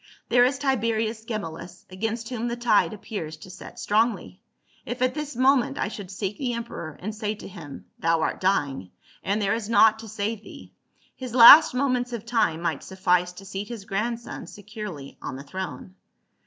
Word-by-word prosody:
"There 245 0 +6
is 270 +2 +1
Tiberius 230 -4 0
Ge 225 -1 -2
mellus, 175 -1 -8
against 225 +4 -3
whom 240 -2 -3
the 235 - -2
tide 235 -3 +3
appears 195 -7 -6
to 185 - -12
set 180 - -11
strongly; 210 -3 0 0.4
if 245 +1 -5
at 255 0 +2
this 300 -3 -5
moment 260 0 +3
I - - -1
should 205 -4 -8
seek 195 +1 -4
the 250 -3 -1
emperor 230 -10 -6
and 215 +3 -5
say 215 0 -3
to - - -10
him, 165 -7 -10
Thou 165 0 +2
art - - -1
dying, 140 - 0 0.3
and 200 +2 0
there 200 0 +1
is 225 -2 -3
naught 220 -1 +5
to 225 - -9
save 215 0 -3
thee; - - -13 0.4
his 255 -2 -7
last 270 +5 +10
moments 250 -2 0
of 230 -2 -5
time 220 -9 +1
might 165 -5 -1
suffice 180 -1 +1
to 190 +2 -12
seat 195 +1 -5
his 230 -5 -8
grandson 230 +4 -3
securely 205 -8 -8
on 130 - -5
the 135 - -8
throne. 185 +4 -6
215 Hz, 185 wpm, -25 LUFS, 185-235 Hz, 0.4 s, last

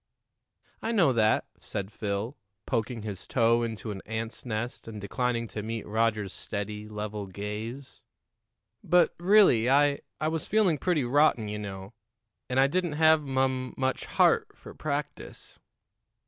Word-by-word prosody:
"I 225 - -1
know 180 - +4
that," 110 -2 +3
said 100 0 -5
Phil, 105 +5 -3 0.3
poking 115 -2 -2
his 100 -4 -6
toe 115 -1 +3
into 115 -1 -4
an 95 -2 -6
ant's 110 0 -4
nest 115 +2 -4
and 110 -2 -7
declining 115 +3 -1
to 105 - -5
meet 115 +1 -4
Roger's 110 -2 0
steady, 105 0 -5
level 105 -1 -5
gaze; 105 +7 -6 0.8
"but, 180 0 +4
really, 175 - +5
I 145 +1 +4 0.2
I 155 - 0
was 160 -1 -2
feeling 195 -8 +3
pretty 175 -6 +1
rotten, 125 -3 +3
you 105 0 -4
know, 95 0 -7 0.6
and 125 +1 +1
I 135 - +6
didn't 175 +3 0
have 160 0 +5
mum 130 -2 -1
much 130 0 -1
heart - - +2
for - - -11
practice." 150 0 -5
115 Hz, 145 wpm, -28 LUFS, 105-145 Hz, 0.8 s, I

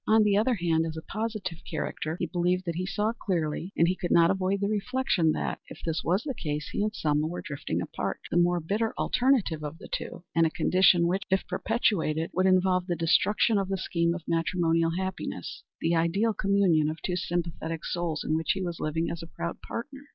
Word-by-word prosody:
On 220 0 +6
the 205 -1 +3
other 230 +4 +3
hand, 165 -4 +1
as 160 0 -5
a 160 - -6
positive 215 -6 -4
character, 160 0 -3
he - - 0
believed 180 +2 0
that 170 - -1
he 180 +2 -3
saw 210 +3 0
clearly, 175 -4 -2
and 170 - +5
he 180 - +1
could 175 -1 -4
not 170 +1 +5
avoid 190 +1 0
the 200 - 0
reflection 210 -5 +1
that, - - -2
if - - -11
this 160 -1 -1
was 185 +7 +1
the 280 - -3
case, 150 -7 -4
he - - -1
and 210 +1 +1
Selma 150 -3 +1
were 175 +2 -5
drifting 140 -2 -3
apart - - -4
the - - +2
more 175 0 +3
bitter 210 +7 -1
alternative 240 - +2
of 150 +2 -5
the - - -11
two, 175 - -5
and 165 0 +4
a - - -1
condition 180 +1 +4
which, 185 +3 +1
if 190 0 +1
perpetuated, 165 -8 0
would 185 +1 +2
involve 185 -1 +3
the 175 - 0
destruction 200 +6 +3
of 195 -1 -2
the 195 - 0
scheme 170 -2 0
of 175 - -7
matrimonial 165 0 +1
happiness, 190 0 -4 0.2
the 165 +1 +1
ideal 195 +7 +2
communion 190 -7 +3
of 160 +1 -5
two 180 - -1
sympathetic 165 -2 -3
souls, 170 -3 -2
in 155 - -1
which 160 -1 +1
he 190 - -4
was 175 -2 -4
living 160 +2 -1
as 170 - -5
a 165 - -8
proud 170 +1 -5
partner. 275 +4 -7
175 Hz, 215 wpm, -28 LUFS, 165-195 Hz, 0.2 s, On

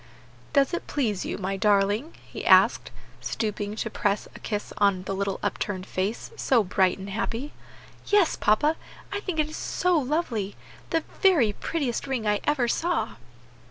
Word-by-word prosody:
"Does 275 +1 +3
it 345 - -3
please 220 -10 -1
you, - - -3
my 195 0 -2
darling?" 205 - +2
he - - -8
asked, - - +5 0.3
stooping 210 -1 -3
to 225 - -3
press 205 0 0
a - - -9
kiss 210 -1 -4
on 200 -3 +3
the 195 - -3
little 195 0 -2
upturned 190 -2 -2
face, 195 +5 -3
so 240 -5 +3
bright 185 -1 +2
and 195 0 -8
happy. 230 +6 -3 0.5
"Yes, 410 -5 +4
papa, 295 +10 +2 0.4
I 405 - -1
think 370 -5 -4
it 305 - +2
is 335 - -5
lovely! 290 - +1 0.3
the 325 -2 +1 0.2
very 315 - +5
prettiest 280 0 -2
ring 255 -5 -2
I 210 -1 +2
ever 285 -5 +2
saw." 340 +8 0
225 Hz, 160 wpm, -26 LUFS, 200-300 Hz, 0.5 s, asked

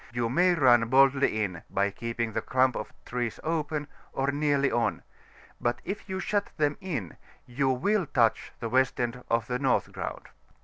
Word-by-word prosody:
you 120 -1 -1
may 175 +7 +3
run 120 -6 +5
boldly 135 -4 +4
in, 90 -4 -4
by 100 +1 +1
keeping 115 +1 -3
the - - -1
clump 130 -1 +2
of - - -5
trees 120 -2 -3
open, 155 -2 -2 0.3
or 135 +1 0
nearly 145 -1 +1
on; 120 0 0 0.6
but 120 0 0
if 195 +2 -5
you 190 0 -2
shut 205 +1 -1
them 145 -1 +1
in, 135 - -4 0.3
you 135 +2 0
will 180 +8 +1
touch 115 -4 +1
the 115 - -3
west 130 +2 +2
end 120 0 -2
of 115 -1 +1
the 125 +2 -2
North 135 -2 +1
Ground. - - -6
130 Hz, 175 wpm, -28 LUFS, 120-145 Hz, 0.6 s, run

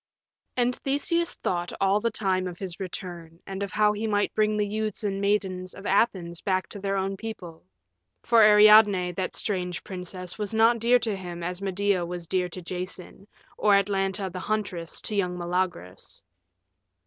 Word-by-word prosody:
And 245 0 +2
Theseus 335 +5 -1
thought 175 -1 -2
all 195 +1 +3
the 230 +2 0
time 190 -4 0
of 175 -1 -7
his 185 -2 -7
return, 175 -3 -7
and 195 0 -6
of 200 -1 -3
how 210 +1 +3
he 215 +2 -3
might 205 -1 +1
bring 215 0 +1
the 210 - +1
youths 215 0 -3
and 195 -1 -1
maidens 190 -3 -1
of 195 - -11
Athens 185 -5 +1
back 185 -2 0
to 205 - -8
their 195 0 -1
own 195 0 -1
people. 185 -7 -8 0.6
For 230 -1 +5
Ariadne, 210 -3 +7
that 185 +1 -3
strange 180 -4 -1
princess, 180 0 -7
was 210 +1 -3
not 230 +1 +4
dear 240 +2 +5
to 225 -3 -2
him 175 -2 -7
as 180 +2 -4
Medea 195 -1 0
was 175 0 -5
dear 180 +1 0
to 180 +1 -8
Jason, 185 +2 -7 0.3
or 205 -1 +5
Atalanta 195 0 0
the 185 - -4
Huntress 185 -5 -3
to 215 - -2
young 180 -3 0
Meleagrus. 175 - -3
195 Hz, 170 wpm, -26 LUFS, 180-210 Hz, 0.6 s, Ariadne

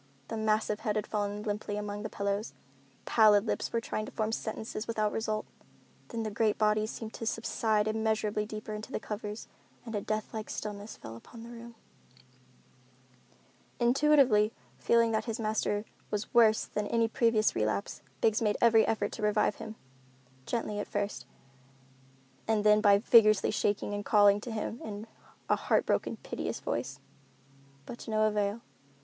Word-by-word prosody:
The - - -3
massive 215 -1 0
head 210 -1 -1
had 215 -1 -1
fallen 205 0 -2
limply 205 0 -3
among 205 0 -4
the 215 - -4
pillows. 200 +2 -2 0.5
Pallid 215 -2 +5
lips - - -2
were 230 - +1
trying 215 -1 -4
to - - -8
form 215 0 -1
sentences 220 -1 -4
without 215 -2 0
result. 215 -1 -2 0.6
Then 230 -1 -4
the 215 - -3
great 215 +1 +1
body 215 0 +2
seemed 220 0 -7
to 225 - -5
subside 220 -1 0
immeasurably 215 -1 0
deeper 215 0 -6
into 210 +1 -7
the - - -2
covers 210 0 -6 0.4
and 230 - -7
a 205 - -1
death 215 +1 -3
like 220 -1 -5
stillness 210 0 -6
fell 110 +1 -9
upon 225 - -12
the 235 - -10
room. 235 0 -10 2.0
Intuitively 245 -4 +4 0.3
feeling 230 -1 +3
that 220 - 0
his 230 0 -3
master 215 -1 -1 0.2
was 210 0 -3
worse 220 -2 +5
than 210 0 -3
at - - -7
any 230 -1 +3
previous 225 -2 +2
relapse, 110 -2 -1 0.2
Biggs 220 0 +3
made 210 -2 +1
every 225 -2 +5
effort 210 -2 0
to - - -7
revive 210 0 +2
him, 220 -1 -7 0.7
gently 215 -3 -2
at 205 - -3
first, 200 -12 -3 1.2
and 220 -2 +2
then 210 0 +5
by 200 -1 +6
vigorously 215 -1 +5
shaking 205 -1 0
and 205 0 -3
calling 205 0 +5
to 240 - -7
him 220 +1 -4
in 210 0 -6 0.4
a - - +4
heart - - +1
broken, - - 0
piteous - - -4
voice. - - -3 0.9
But 240 - -8
to - - -9
no 215 0 +2
avail. 210 +1 0
215 Hz, 165 wpm, -30 LUFS, 210-225 Hz, 2.0 s, by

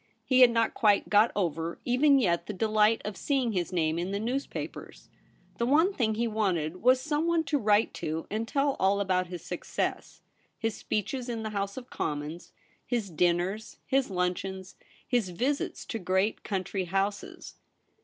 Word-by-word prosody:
He 260 -1 +3
had 250 -1 +9
not 230 -1 +1
quite 210 -3 +3
got 210 +2 +5
over, 165 -3 -2
even 275 +3 +4
yet, 170 -8 +1
the 210 - -4
delight 215 +2 +2
of 210 -1 -4
seeing 265 -5 0
his 180 -4 -2
name 165 -2 0
in 175 +2 -2
the 200 +1 -2
newspapers. 250 +6 -5 0.5
The 235 - +1
one 320 +9 +4
thing 220 - 0
he 235 +2 0
wanted 185 -7 -1
was 255 +2 +5
someone 320 +4 +1
to 295 -2 0
write 210 -1 +3
to 160 +1 -3
and 220 +2 -2
tell 275 +2 +1
all 195 +1 +3
about 185 -2 +1
his 175 -1 -8
success; - - -4 0.4
his 225 -1 -2
speeches 240 +5 -3
in 230 -2 -3
the 220 - -4
House 200 0 -3
of 255 -1 -9
Commons, 150 +3 -4 0.3
his 230 -6 -2
dinners, 175 +6 0
his 270 -2 +1
luncheons, 185 +1 -3 0.3
his 240 -7 +1
visits 255 +11 -2
to 225 - -4
great 190 +3 0
country 190 -1 -2
houses. 195 +3 -3
210 Hz, 165 wpm, -28 LUFS, 185-245 Hz, 0.5 s, had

